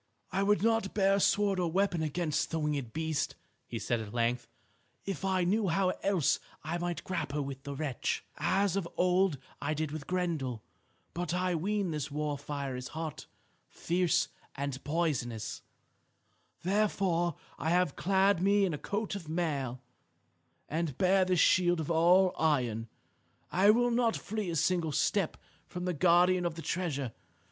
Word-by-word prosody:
"I 190 +2 0
would 200 -2 +3
not 225 -3 +1
bear 195 -1 +4
a - - +1
sword 200 -1 +2
or 175 -2 0
weapon 185 -2 +1
against 155 0 -1
the 165 - -2
winged 145 -6 -1
beast," 160 0 -2 0.3
he 120 - -4
said 120 +1 -1
at 110 0 -7
length, 120 0 0 0.6
"if 195 0 -4
I 190 -1 +1
knew 200 +4 +2
how 185 +2 +2
else 190 -7 +2 0.2
I 165 +3 -2
might 175 0 -3
grapple 150 -5 -2
with 135 -1 -6
the 140 0 -6
wretch, 135 -4 -2
as 195 -1 +1
of 185 -4 -2
old 180 -2 +3 0.2
I 155 +2 -1
did 155 -1 -2
with 155 -1 -6
Grendel. 160 -11 -2 0.5
But 175 0 -2
I 180 0 +1
ween 195 +2 0
this 150 -3 -3
war 150 0 -2
fire 140 -2 -4
is 125 0 -5
hot, 160 -1 -5 0.4
fierce, 175 0 +1 0.3
and 140 -1 -4
poisonous. 140 -9 -2 1.0
Therefore 185 -4 +1 0.2
I 160 - -1
have 175 -3 +2
clad 195 +1 +3
me 200 +1 +4
in 180 - -1
a 150 - -4
coat 205 +1 -3
of 180 -6 -6
mail, 140 -7 -2 0.8
and 160 -4 -2
bear 190 0 +4
this 185 -2 +2
shield 175 -3 +3
all 175 +3 +5
of - - -12
iron. 125 -8 +1 0.6
I 190 +3 +4
will 240 +3 +4
not 235 -1 +2
flee 215 -2 -4
a 170 - -2
single 165 0 +1
step 195 +3 +1 0.3
from 180 0 -5
the 180 - 0
guardian 180 +2 +4
of 170 -2 -1
the 165 - -7
treasure. 145 -9 -2
170 Hz, 165 wpm, -31 LUFS, 150-190 Hz, 1.0 s, all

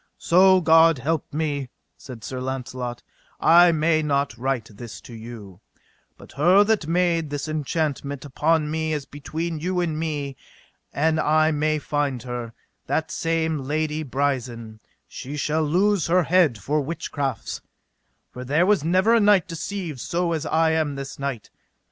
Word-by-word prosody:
So 185 0 +5
God 165 -1 +5
me - - -9 0.6
help, 135 -3 -7 0.3
said 125 -5 -11
Sir 130 +2 -5
Launcelot, 125 -2 -5 0.4
I 175 +1 +6
may 155 0 +2
not 140 -4 0
wite 120 -2 -3
this 120 0 -9
to 120 - -12
you; 110 -4 -10 0.6
but - - -15
her 180 +8 +5
that 205 -7 0
made 170 -2 +1
this 145 +1 -4
enchantment 145 -2 -2
upon 150 +2 +1
me 160 0 -1
as 145 -3 -3
between 160 +3 -5
you 180 +3 -1
and 160 -3 -1
me, 145 -4 -3 0.5
an 160 +2 +1
I 155 +1 +3
may 155 0 +1
find 145 -5 -2
her, 120 -2 -6 0.3
that 160 0 -1
same 160 -1 -1
Lady 150 +3 -2
Brisen, 125 -6 -3 0.3
she 140 +3 -7
shall 155 +2 0
lose 180 +4 +2
her 180 +2 +3
head 165 -7 +3
for 150 +7 -1
witchcrafts, 140 -3 -4 0.7
for 125 - -8
there 150 +7 +2
was 200 -5 +2
never 190 +8 +3
knight 205 -4 +4
deceived 170 -3 -5
so 170 +6 -1
as 160 -1 -3
I 160 +1 +2
am 155 -3 0
this 135 0 -7
night. 135 -6 -4
155 Hz, 150 wpm, -23 LUFS, 135-165 Hz, 0.7 s, I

